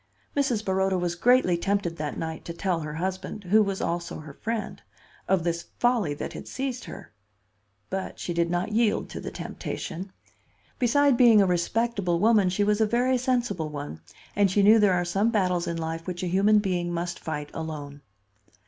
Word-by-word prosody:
Mrs. 250 Hz, -7 st, 0 dB
Baroda 190 Hz, 0 st, +1 dB
was 175 Hz, -1 st, -1 dB
greatly 235 Hz, 0 st, +4 dB
tempted 195 Hz, -2 st, -1 dB
that 150 Hz, -1 st, -4 dB
night 160 Hz, -1 st, -5 dB
to 170 Hz, -, -5 dB
tell 175 Hz, 0 st, -1 dB
her 150 Hz, -1 st, -5 dB
husband—who 190 Hz, +3 st, 0 dB
was 195 Hz, -2 st, -1 dB
also 170 Hz, -1 st, -3 dB
her 150 Hz, -2 st, -10 dB
friend—of 210 Hz, -3 st, -4 dB
this 170 Hz, 0 st, -2 dB
folly 230 Hz, -12 st, +1 dB
that -, -, -5 dB
had -, -, -8 dB
seized 260 Hz, -2 st, -4 dB
her. 195 Hz, -4 st, -10 dB, 0.8 s
But 190 Hz, 0 st, -4 dB
she 175 Hz, -, -4 dB
did 170 Hz, 0 st, +1 dB
not 175 Hz, +4 st, -1 dB
yield 220 Hz, 0 st, +1 dB
to -, -, -6 dB
the -, -, -5 dB
temptation. 185 Hz, +2 st, -6 dB, 0.7 s
Beside 275 Hz, +2 st, +4 dB
being 235 Hz, -4 st, +7 dB
a 200 Hz, -, +5 dB
respectable 185 Hz, +1 st, 0 dB
woman 210 Hz, -2 st, +4 dB
she 185 Hz, +3 st, +1 dB
was 210 Hz, +1 st, +2 dB
a 220 Hz, -, +4 dB
very 250 Hz, +3 st, +2 dB
sensible 240 Hz, -, 0 dB
one; 145 Hz, -, -7 dB, 0.3 s
and 200 Hz, -1 st, +4 dB
she 200 Hz, +2 st, +2 dB
knew 215 Hz, +3 st, +7 dB
there 200 Hz, -3 st, +4 dB
are 175 Hz, 0 st, 0 dB
some 195 Hz, +6 st, +1 dB
battles 180 Hz, -5 st, +1 dB
in 170 Hz, -1 st, -2 dB
life 165 Hz, +1 st, -4 dB
which 180 Hz, 0 st, -4 dB
a -, -, -1 dB
human 200 Hz, +4 st, +4 dB
being 180 Hz, -4 st, 0 dB
must 175 Hz, 0 st, -3 dB
fight 150 Hz, -2 st, -5 dB
alone. 145 Hz, -3 st, -6 dB
190 Hz, 180 wpm, -26 LUFS, 170-215 Hz, 0.8 s, being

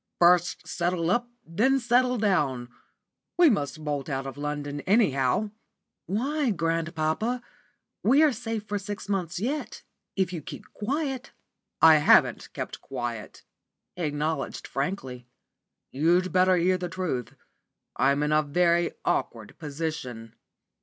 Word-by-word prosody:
First 175 Hz, 0 st, +3 dB
settle 175 Hz, -1 st, 0 dB
up, 240 Hz, +3 st, +1 dB, 0.2 s
then 235 Hz, +11 st, +2 dB
settle 250 Hz, +1 st, +2 dB
down. 145 Hz, -, 0 dB, 0.7 s
We 345 Hz, -4 st, +7 dB
must 155 Hz, -, -2 dB
bolt 145 Hz, -1 st, -3 dB
out 135 Hz, -1 st, -2 dB
of 135 Hz, -, -6 dB
London, 145 Hz, 0 st, -4 dB
anyhow." 190 Hz, -, +2 dB, 0.6 s
"Why, 265 Hz, -, 0 dB
grandpapa? 165 Hz, +6 st, -1 dB, 0.6 s
We 270 Hz, +8 st, +5 dB
are 305 Hz, -, +5 dB
safe 225 Hz, -2 st, -4 dB
for 205 Hz, 0 st, -2 dB
six 205 Hz, 0 st, -6 dB
months 180 Hz, -4 st, -2 dB
yet, 275 Hz, +9 st, -3 dB, 0.3 s
if 190 Hz, -2 st, 0 dB
you 165 Hz, -, -4 dB
keep -, -, -10 dB
quiet." 270 Hz, +3 st, -3 dB, 0.5 s
"I 160 Hz, -1 st, +9 dB
haven't 150 Hz, -, +4 dB
kept -, -, -6 dB
quiet," 120 Hz, -4 st, -6 dB, 0.5 s
he 180 Hz, -, -7 dB
acknowledged 150 Hz, -1 st, -2 dB
frankly. 135 Hz, -5 st, -4 dB, 0.6 s
"You'd 175 Hz, +6 st, +2 dB
better 185 Hz, 0 st, +4 dB
hear 185 Hz, +2 st, +2 dB
the 180 Hz, -1 st, -4 dB
truth. 170 Hz, -9 st, -3 dB, 0.6 s
I'm 140 Hz, +2 st, +2 dB
in 150 Hz, -, 0 dB
a 155 Hz, 0 st, +4 dB
very 170 Hz, +3 st, +2 dB
awkward 110 Hz, -3 st, -2 dB
position." 140 Hz, -7 st, -5 dB
170 Hz, 125 wpm, -27 LUFS, 145-210 Hz, 0.7 s, I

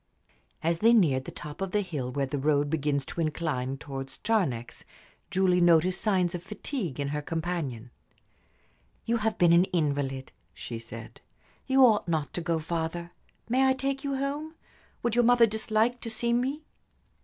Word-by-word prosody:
As 165 Hz, +1 st, +1 dB
they 230 Hz, +4 st, +5 dB
neared 145 Hz, -, +3 dB
the -, -, -6 dB
top 150 Hz, +3 st, -8 dB
of 195 Hz, -, -1 dB
the 210 Hz, +3 st, +1 dB
hill 145 Hz, -10 st, -4 dB
where 140 Hz, +1 st, 0 dB
the 140 Hz, +1 st, -3 dB
road 145 Hz, 0 st, +2 dB
begins 145 Hz, -3 st, 0 dB
to 170 Hz, -, -4 dB
incline 150 Hz, -5 st, -2 dB
towards 135 Hz, -1 st, -7 dB
Charnex, 155 Hz, -, -1 dB, 0.5 s
Julie 185 Hz, -1 st, +3 dB
noticed 175 Hz, +2 st, +4 dB
signs 185 Hz, -5 st, +2 dB
of 175 Hz, -, -4 dB
fatigue 195 Hz, -, -5 dB
in 140 Hz, 0 st, -1 dB
her 150 Hz, +1 st, -2 dB
companion. 155 Hz, -8 st, -3 dB, 1.1 s
"You 235 Hz, +1 st, +1 dB
have 220 Hz, 0 st, -1 dB
been 170 Hz, -1 st, +5 dB
an 175 Hz, +2 st, +6 dB
invalid," 140 Hz, -6 st, -1 dB, 0.2 s
she 115 Hz, -1 st, -6 dB
said. 115 Hz, 0 st, -10 dB, 0.5 s
"You 265 Hz, -1 st, +6 dB
ought 215 Hz, -6 st, +3 dB
not 160 Hz, -4 st, -1 dB
to 175 Hz, -, -3 dB
go 170 Hz, -1 st, 0 dB
farther. 165 Hz, +1 st, -3 dB, 0.4 s
May 260 Hz, +3 st, +3 dB
I 265 Hz, -, +4 dB
take 270 Hz, +1 st, -2 dB
you 280 Hz, -1 st, -1 dB
home? 290 Hz, +4 st, -3 dB, 0.5 s
Would 235 Hz, -, +1 dB
your 240 Hz, +1 st, +4 dB
mother 240 Hz, 0 st, +6 dB
dislike 220 Hz, +2 st, 0 dB
to 230 Hz, -, -4 dB
see 235 Hz, +1 st, 0 dB
me?" 265 Hz, +6 st, 0 dB
175 Hz, 170 wpm, -28 LUFS, 145-225 Hz, 1.1 s, an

